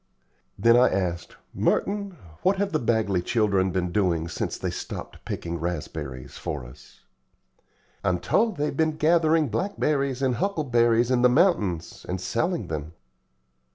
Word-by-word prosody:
Then 115 0 +5
I 125 - +6
asked, 90 -3 -2 0.2
"Merton, 200 -2 0 0.2
what 190 +2 +3
have 200 0 0
the 155 - +1
Bagley 110 -6 +1
children 100 -2 +1
been 90 -1 -1
doing 85 -4 +1
since - - -3
they - - -3
stopped - - -7
picking 85 0 -4
raspberries 75 -6 -5
for 60 - -4
us?" 60 - -16 1.0
"I'm 90 - +2
told 225 - +1
they've 145 -1 -1
been 155 +1 +1
gathering 160 -2 +3
blackberries 140 - -1
and 125 -3 +1
huckleberries 120 - +2
in 125 -1 +3
the 125 - +6
mountains, 120 - +1
and 90 +1 -2
selling 160 - -1
them." 80 +1 -5
120 Hz, 140 wpm, -25 LUFS, -, 1.0 s, I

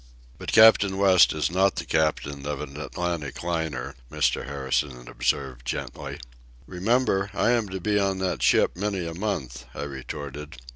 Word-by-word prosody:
"But - - -4
Captain 105 -3 +6
West 95 -2 +6
is 75 +1 -1
not 95 +2 +3
the - - -4
captain 75 -3 -1
of 75 - -3
an 70 -2 -7
Atlantic 75 0 -4
liner," 80 -6 -2 0.2
Mr. - - 0
Harrison 65 -2 -2
observed - - -2
gently. 60 - -5 0.5
"Remember, 95 - +1
I 120 - +3
am 115 -4 +1
to 95 0 -4
be 105 +3 +1
on 95 -1 +1
that 95 -1 -2
ship - - +3
many 95 -1 -2
a 85 - -4
month," 70 - -4
I - - -4
retorted. 70 +1 -7
80 Hz, 155 wpm, -25 LUFS, 70-95 Hz, 0.5 s, Captain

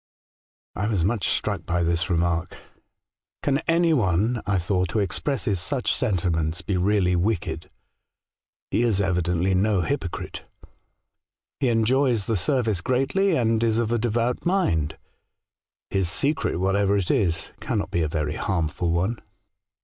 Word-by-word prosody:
" - - - 0.3
I 100 - -1
was 100 -7 +1
much 105 0 0
struck 100 -6 -1
by 90 0 +1
this 85 +2 0
remark. 85 -1 0 0.4
' - - -54
Can 140 -1 +2
any 165 0 +3
one, 110 - +1
I 100 -1 +2
thought, 90 0 0
who 110 - +2
expresses 100 - -1
such 130 - -1
senti 100 - 0
ments 80 -1 -1
be 100 - -1
really 90 -1 +2
wicked? 90 +2 -1 1.0
He - - +2
is 115 -5 +2
evidently 90 -1 +1
no 100 0 +2
hypocrite. 95 -5 -4 1.2
He 130 - +2
enjoys 120 -1 +2
the 115 - 0
service 110 0 0
greatly, 135 - +1
and 115 -2 +1
is 115 -1 +2
of 115 -1 0
a 120 - +1
devout 120 +2 0
mind. 85 - +1 0.9
His 95 -3 +1
secret, 140 - 0
whatever 100 +2 +2
it 95 -4 0
is, 95 - 0
cannot - - -2
be 85 - 0
a 80 - +1
very 75 -1 -2
harmful 85 -2 -1
one.' 95 +8 0
100 Hz, 150 wpm, -24 LUFS, 85-120 Hz, 1.2 s, any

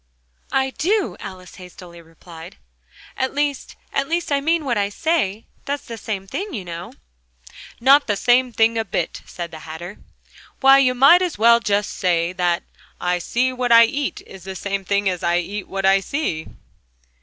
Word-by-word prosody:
"I 265 0 +1
do," 390 +8 0
Alice 185 -1 -10
hastily 180 -1 -12
replied; 165 - -13 0.6
"at 260 +1 -2
least 290 -1 -2 0.2
at 275 0 -1
least 340 -1 -1
I 280 -1 +2
mean 325 +1 +1
what 245 -3 0
I 200 -1 0
say 225 - -1 0.2
that's 285 0 -3
the 230 - -7
same 205 -3 -5
thing, 380 - -5
you 195 -5 -6
know." 170 0 -7 0.9
"Not 275 +4 +5
the 205 - +1
same 245 +4 +3
thing 225 0 +2
a - - 0
bit!" 175 -4 -3
said 170 -1 -7
the 160 - -9
Hatter. 160 +6 -9 0.6
"Why, 270 0 +7
you 255 -2 +3
might 275 +8 +7
just 360 -3 -1
as - - -13
well 235 +2 +5 0.2
say 175 -3 -1
that 175 -2 0 0.4
'I 180 0 0
see 255 +8 0
what 250 -1 -2
I 230 0 +9
eat' 280 +4 -3
is 190 -2 -13
the 190 0 -7
same 200 +1 -3
thing 200 +1 0
as 180 -2 -1
'I 170 0 +1
eat 195 +3 -4
what 195 0 -3
I 195 0 +5
see'!" 195 - -3
210 Hz, 180 wpm, -21 LUFS, 180-270 Hz, 0.9 s, I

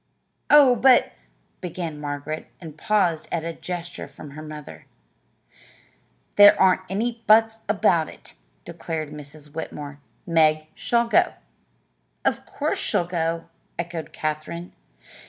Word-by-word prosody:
"Oh, 285 -4 +7
but 250 +1 +5 0.2
" - - -42
began 165 -4 -5
Margaret, 145 +1 -5
and 160 -4 -10
paused 175 -3 +1
at 165 -2 -1
a 165 0 -4
gesture 175 0 -6
from 145 - -12
her 150 +2 -9
mother. 150 -1 -10 1.5
"There 205 0 +8
aren't 185 -1 +4
any 230 +4 -2
'buts' 225 +1 +5
about 195 -6 +2
it," - - -14 0.3
declared 155 -2 -5
Mrs. 150 0 -11
Whitmore. 145 -3 -7 0.3
"Meg 155 -2 +3
shall 235 0 +1
go." 230 - +3 0.9
"Of - - 0
course - - -2
she'll 175 - 0
go!" 165 -1 -2 0.3
echoed 170 -2 -5
Katherine. 155 +3 -4
165 Hz, 120 wpm, -24 LUFS, 155-200 Hz, 1.5 s, There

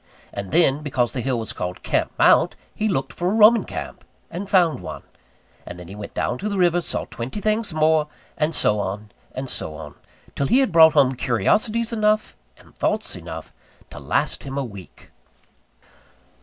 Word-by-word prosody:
And 100 -1 -5
then, 150 -4 +3
because 130 -5 0
the 125 - -3
hill 130 0 -1
was 110 -2 -3
called 90 0 -5
Camp - - 0
Mount, - - +4 0.2
he 215 0 -1
looked 135 -8 -2
for 175 +1 -1
a 205 - 0
Roman 225 +2 +6
camp, - - -7 0.3
and 190 +4 -6
found 175 - +3
one; 90 - -8 0.6
and 90 - -9
then 90 -1 -10
he 95 - -9
went 105 0 -9
down - - -1
to 210 - -3
the 200 - -2
river, 175 -1 +3
saw - - -2
twenty 120 - -6
things 215 0 0
more; 155 -1 +2 0.3
and 155 +1 0
so 105 -6 +2
on, 105 +2 -4 0.2
and 130 +1 -5
so 80 -10 -4
on, 75 -2 -9 0.4
till 140 - -1
he 245 - +4
had 270 -1 +2
brought 160 -1 +7
home 130 -1 +4
curiosities 215 - +1
enough, 215 -1 +1 0.2
and - - -20
thoughts - - -1
enough, - - -9 0.4
to - - -9
last - - -1
him 135 0 -6
a 140 - 0
week. 100 - -12
150 Hz, 185 wpm, -22 LUFS, -, 0.6 s, brought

